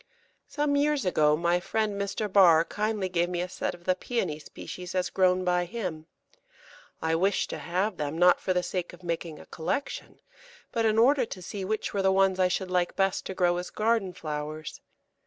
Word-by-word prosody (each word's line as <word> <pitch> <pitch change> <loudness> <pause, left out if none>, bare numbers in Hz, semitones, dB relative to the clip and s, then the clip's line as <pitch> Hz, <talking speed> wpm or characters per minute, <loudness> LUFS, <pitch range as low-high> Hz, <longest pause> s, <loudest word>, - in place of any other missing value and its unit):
Some 290 -1 0
years 290 -2 +2
ago 150 -4 +3
my 170 +1 +2
friend 215 +3 -1
Mr. 200 +2 -2
Barr 175 -5 +6
kindly 210 -1 -1
gave 175 -1 0
me 180 -1 -2
a 180 - -1
set 180 - -3
of 175 - -18
the 185 - +2
Pæony 180 -7 -3
species 180 0 -8
as 180 -1 0
grown 185 -1 +3
by 180 0 +2
him. 175 -7 -5 1.0
I 160 0 +1
wished 190 +4 +1
to - - -5
have 185 +4 -1
them, 150 +2 -3
not 180 +1 +5
for 190 - -2
the 180 -1 +1
sake 175 0 -3
of 175 +1 -14
making 165 -2 -3
a - - -12
collection, 220 - -4 0.5
but 230 -2 0
in 215 0 +2
order 265 +4 +5
to 185 - -8
see 195 +2 -5
which 215 +3 -2
were 200 - 0
the 190 0 +3
ones 190 -1 +3
I 185 - +5
should 185 0 -2
like 180 -1 +1
best 195 -1 0
to 190 - -5
grow 175 -1 +2
as 180 0 -4
garden 220 -3 +1
flowers. 155 -1 -6
185 Hz, 200 wpm, -28 LUFS, 175-205 Hz, 1.0 s, Barr